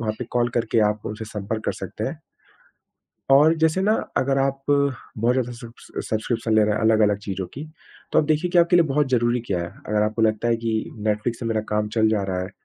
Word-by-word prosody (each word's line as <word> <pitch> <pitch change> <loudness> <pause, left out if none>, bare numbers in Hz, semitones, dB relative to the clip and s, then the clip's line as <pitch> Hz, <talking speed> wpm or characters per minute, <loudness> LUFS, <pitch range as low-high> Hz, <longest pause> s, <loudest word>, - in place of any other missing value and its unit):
वहाँ 110 -2 -1
पे 125 - -4
कॉल 120 0 +1
करके 115 -1 +1
आप 105 0 -6
उनसे 105 +1 -5
संपर्क 105 +1 -5
कर - - 0
सकते - - -6
हैं। - - -4 1.1
और 150 +4 +7
जैसे 160 +3 +3
ना, 210 +3 +3 0.2
अगर 135 +1 +1
आप 135 0 0
बहुत 135 -4 0
ज़्यादा 125 -1 -1
सब्स 120 -1 -12 0.2
सब्स्क्रिप्शन 110 +1 -1
ले 110 - +5
रहे 105 - +1
हैं, - - -2
अलग-अलग 110 -2 +3
चीज़ों 95 -2 -4
की, 140 - -6 0.5
तो - - +4
आप 150 - +1
देखिए 155 +3 +1
कि 175 - +2
आपके 170 +1 +5
लिए 170 -2 +5
बहुत 145 0 +1
ज़रूरी 120 -1 +2
क्या 90 -3 0
है। 85 - -4 0.2
अगर 105 0 +1
आपको 110 +2 -1
लगता 110 +1 +1
है 115 - +3
कि 115 -1 -2 0.2
नेटफ्लिक्स 105 +2 -1
से 120 - -5
मेरा 110 -1 0
काम 105 0 0
चल 110 -1 +4
जा 110 -2 +1
रहा 90 -1 -1
है, 90 - -5
115 Hz, 230 wpm, -23 LUFS, 110-135 Hz, 1.1 s, और